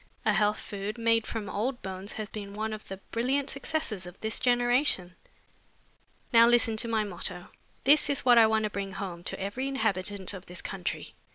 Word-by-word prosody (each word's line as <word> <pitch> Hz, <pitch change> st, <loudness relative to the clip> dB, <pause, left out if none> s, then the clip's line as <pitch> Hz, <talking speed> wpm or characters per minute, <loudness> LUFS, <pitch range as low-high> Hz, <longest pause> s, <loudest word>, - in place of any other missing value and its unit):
A 210 Hz, -, +4 dB
health 210 Hz, +2 st, +2 dB
food 205 Hz, +3 st, -5 dB
made 230 Hz, -1 st, +2 dB
from 220 Hz, -3 st, -4 dB
old 240 Hz, +6 st, -2 dB
bones 190 Hz, +1 st, -5 dB
has 215 Hz, -1 st, -4 dB
been 205 Hz, -2 st, -8 dB
one 220 Hz, +1 st, -2 dB
of 215 Hz, -, -8 dB
the 195 Hz, -, -6 dB
brilliant 265 Hz, +4 st, 0 dB
successes 275 Hz, -, -2 dB
of 180 Hz, +1 st, -12 dB
this 220 Hz, 0 st, 0 dB
generation. 245 Hz, -6 st, +2 dB, 1.2 s
Now 230 Hz, 0 st, +8 dB
listen 235 Hz, -2 st, +4 dB
to 235 Hz, -, 0 dB
my 220 Hz, -2 st, +1 dB
motto. 175 Hz, -2 st, -5 dB, 0.3 s
This 295 Hz, +3 st, +6 dB
is 280 Hz, -3 st, -1 dB
what 245 Hz, -2 st, +7 dB
I 225 Hz, -, +7 dB
want 220 Hz, 0 st, +2 dB
to 210 Hz, -, -1 dB
bring 195 Hz, -1 st, -4 dB
home 175 Hz, -4 st, -6 dB
to -, -, -2 dB
every 205 Hz, +8 st, -3 dB
inhabitant 205 Hz, -7 st, -1 dB
of 190 Hz, -1 st, -9 dB
this 180 Hz, +1 st, -6 dB
country. 195 Hz, 0 st, -4 dB
215 Hz, 190 wpm, -29 LUFS, 195-240 Hz, 1.2 s, Now